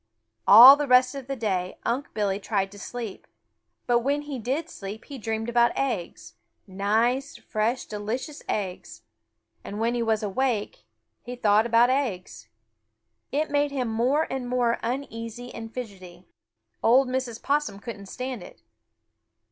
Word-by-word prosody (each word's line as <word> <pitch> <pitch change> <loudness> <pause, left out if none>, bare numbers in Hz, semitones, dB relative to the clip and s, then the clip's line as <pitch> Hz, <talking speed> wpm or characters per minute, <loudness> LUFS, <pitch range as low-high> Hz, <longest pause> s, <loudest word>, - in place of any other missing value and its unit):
All 245 +7 +11
the 295 -1 -2
rest 255 0 +5
of 275 -2 -7
the 275 - -3
day 190 -6 -2
Unc' 255 +5 -2
Billy 200 -2 0
tried 195 -2 -1
to 205 - -12
sleep, 230 -1 -7 0.6
but 240 -1 +3
when 285 +4 -1
he 285 -3 -6
did 270 +8 -2
sleep 205 -5 -8
he 275 -2 -9
dreamed 225 0 -3
about 240 0 +2
eggs, 235 -11 -3 0.3
nice, 225 +8 0
fresh, 225 +4 -2
delicious 225 +8 -5
eggs, 185 - -4 0.6
and 205 - -6
when 230 +1 +1
he 240 - -1
was 220 -2 0
awake 215 +1 -2 0.4
he 245 - -7
though 210 -3 +3
about 235 +2 +4
eggs. 185 - -3 0.8
It 300 +2 -1
made 290 0 +2
him 260 -4 -2
more 250 +8 +1
and 260 -2 -3
more 245 -2 +1
uneasy 240 -1 -5
and 225 -1 -8
fidgety. 185 -7 -9 0.6
Old 255 +4 +5
Mrs. 255 -3 -3
Possum 290 -7 0
couldn't 205 -3 -8
stand 255 0 -5
it. 175 - -14
235 Hz, 150 wpm, -26 LUFS, 210-260 Hz, 0.8 s, All